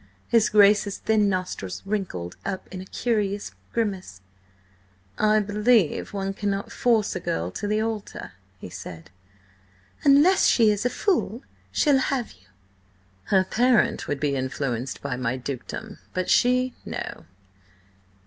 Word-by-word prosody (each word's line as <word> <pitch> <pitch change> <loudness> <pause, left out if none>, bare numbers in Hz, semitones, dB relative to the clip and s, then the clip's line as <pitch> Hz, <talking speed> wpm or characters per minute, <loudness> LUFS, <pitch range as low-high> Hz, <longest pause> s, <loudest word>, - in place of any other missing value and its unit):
His 230 -2 +3
Grace's 205 -1 +4
thin 215 -2 +2
nostrils 185 - -3
wrinkled 185 - -3
up 190 -1 -4
in 185 - -5
a - - -9
curious 205 -4 -1 0.2
grimace. 195 - -3 1.0
"I 215 0 +4
believe 210 -3 +2
one 195 -1 -3
cannot 200 0 -3
force 225 -5 +1
a - - -1
girl 85 - -2
to 205 - -4
the 215 +1 +1
altar," 220 - -5 0.3
he - - -9
said. 85 +1 -9 0.9
"Unless 295 +7 +5
she 225 -3 +5
is 210 +4 0
a - - -1
fool, 270 - -1 0.3
she'll 285 -3 +3
have 260 -2 -1
you." 90 0 -21 0.8
"Her 190 -1 +3
parent 240 +4 +2
would 145 - -2
be 145 -1 0
influenced 130 -1 -3
by 140 -3 -2
my 125 0 -1
dukedom, 140 - -6 0.2
but 185 0 0
she, 250 +1 +3
no. - - -6
200 Hz, 135 wpm, -25 LUFS, 145-225 Hz, 1.0 s, Unless